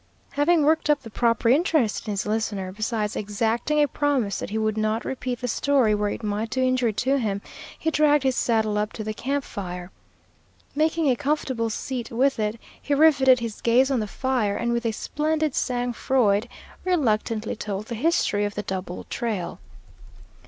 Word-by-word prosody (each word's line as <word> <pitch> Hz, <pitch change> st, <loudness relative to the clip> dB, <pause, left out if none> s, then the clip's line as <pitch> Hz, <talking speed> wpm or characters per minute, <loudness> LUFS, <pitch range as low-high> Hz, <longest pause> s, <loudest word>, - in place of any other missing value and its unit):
Having 305 Hz, +3 st, +3 dB
worked 315 Hz, 0 st, +2 dB
up 295 Hz, -1 st, +3 dB
the 225 Hz, -, -10 dB
proper 230 Hz, 0 st, +1 dB
interest 270 Hz, -, +2 dB
in -, -, -1 dB
his 200 Hz, -, -2 dB
listener, 210 Hz, -3 st, -2 dB
besides 215 Hz, +1 st, -2 dB
exacting 225 Hz, +8 st, 0 dB
a -, -, +2 dB
promise 275 Hz, -8 st, 0 dB
that -, -, -5 dB
he 215 Hz, -, -2 dB
would 215 Hz, -1 st, 0 dB
not 215 Hz, +1 st, -1 dB
repeat 255 Hz, -2 st, -4 dB
the 250 Hz, -, -2 dB
story 255 Hz, -2 st, +2 dB
where 210 Hz, 0 st, 0 dB
it 225 Hz, -, -5 dB
might 210 Hz, +2 st, -2 dB
do 260 Hz, -, -2 dB
injury 255 Hz, -2 st, +2 dB
to 270 Hz, +6 st, +1 dB
him, 205 Hz, -5 st, -1 dB, 0.4 s
he 320 Hz, -, -1 dB
dragged 295 Hz, -2 st, +3 dB
his 260 Hz, -1 st, +1 dB
saddle 220 Hz, -3 st, +1 dB
up 210 Hz, 0 st, -2 dB
to 220 Hz, -, -5 dB
the 215 Hz, 0 st, -3 dB
camp 275 Hz, +5 st, -2 dB
fire. 180 Hz, -4 st, -6 dB, 0.8 s
Making 315 Hz, +1 st, +1 dB
a 255 Hz, -, +4 dB
comfortable 260 Hz, -4 st, -1 dB
seat 245 Hz, +2 st, -4 dB
with 265 Hz, +2 st, +1 dB
it, 215 Hz, +1 st, -1 dB, 0.2 s
he 285 Hz, -, 0 dB
riveted 275 Hz, -5 st, +5 dB
his 230 Hz, -3 st, -5 dB
gaze 255 Hz, +4 st, +3 dB
on 260 Hz, -, +2 dB
the 215 Hz, -, -2 dB
fire, 240 Hz, -3 st, -1 dB
and 235 Hz, 0 st, 0 dB
with 235 Hz, 0 st, 0 dB
a -, -, +1 dB
splendid 305 Hz, +5 st, -1 dB
sang 245 Hz, -2 st, -1 dB
froid 230 Hz, -3 st, +1 dB, 0.3 s
reluctantly 230 Hz, -10 st, 0 dB
told 205 Hz, -1 st, -4 dB
the 235 Hz, -, -6 dB
history 230 Hz, -5 st, +1 dB
of 205 Hz, 0 st, -2 dB
the 210 Hz, -, -3 dB
double 185 Hz, -2 st, -5 dB
trail. 215 Hz, -8 st, -3 dB
235 Hz, 185 wpm, -24 LUFS, 215-275 Hz, 0.8 s, riveted